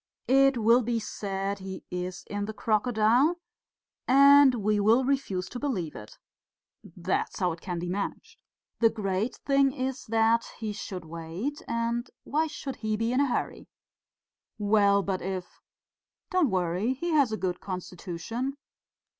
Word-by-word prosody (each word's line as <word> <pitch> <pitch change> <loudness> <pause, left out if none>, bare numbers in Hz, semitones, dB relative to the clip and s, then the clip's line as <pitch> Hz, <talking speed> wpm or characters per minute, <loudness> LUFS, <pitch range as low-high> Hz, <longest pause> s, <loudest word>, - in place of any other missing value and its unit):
It 270 0 +5
will 230 +2 +5
be 235 0 -1
said 200 -2 -3
he 190 0 -7
is 180 0 -4
in 205 0 -3
the 215 0 -6
crocodile, 230 +8 +2 0.7
and 280 0 +7
we 210 -1 +1
will 225 +5 +4
refuse 225 -10 -1
to 245 - -6
believe 195 - -2
it. 105 0 -11 0.8
That 180 +1 -1
is - - -9
how 180 -2 +1
it 165 0 -8
can 180 -2 -4
be 175 +1 -4
managed. 195 +3 -4 0.4
The 230 - +5
great 210 +2 -2
thing 275 -1 +4
is 265 0 -4
that 225 +1 +2
he 215 -2 -4
should 190 -4 -6
wait; 170 - -5
and 230 +1 -1
why 310 +3 0
should 280 -3 -6
he 215 -3 -2
be 225 +2 0
in 255 - +2
a 285 - +3
hurry?" 245 - -3 0.9
"Well, 205 -1 +3
but 190 -1 -2
if 185 -1 -5 0.3
..." - - -65
"Don't 365 -7 +3
worry, 185 +6 0
he 345 +6 -3
has 285 -7 +3
a 215 - -1
good 180 -3 -2
constitution...." 185 - -5
220 Hz, 155 wpm, -28 LUFS, 190-255 Hz, 0.9 s, and